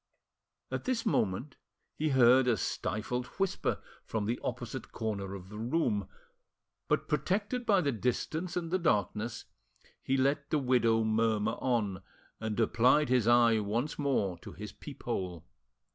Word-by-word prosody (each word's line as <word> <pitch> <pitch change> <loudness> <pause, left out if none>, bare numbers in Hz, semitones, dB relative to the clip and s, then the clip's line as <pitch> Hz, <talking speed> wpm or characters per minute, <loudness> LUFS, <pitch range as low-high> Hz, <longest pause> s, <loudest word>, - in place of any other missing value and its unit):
At - - -3
this 255 -3 0
moment 120 - 0 0.4
he 155 +1 0
heard 130 -1 +6
a 120 -3 +3
stifled 110 +7 -2
whisper 195 -1 0 0.3
from 110 -2 -2
the 115 +3 -1
opposite 120 +1 -5
corner 100 -4 -3
of 95 -1 -10
the 105 +1 -8
room, 115 - 0 0.8
but, - - +1
protected 205 +10 -1
by 200 -4 +5
the 140 - +1
distance 155 - -2
and 165 -2 -3
the 185 - +2
darkness, 110 - 0 0.6
he 135 - 0
let 140 +2 +1
the 155 - +2
widow 120 -4 +3
murmur 110 0 +1
on, 105 -7 0 0.4
and 110 0 -3
applied 125 +6 +4
his 125 -3 +3
eye 120 -2 +5
once 115 +9 -2
more 105 - 0
to - - -10
his - - -7
peephole. 90 -3 -5
120 Hz, 145 wpm, -31 LUFS, 110-145 Hz, 0.8 s, heard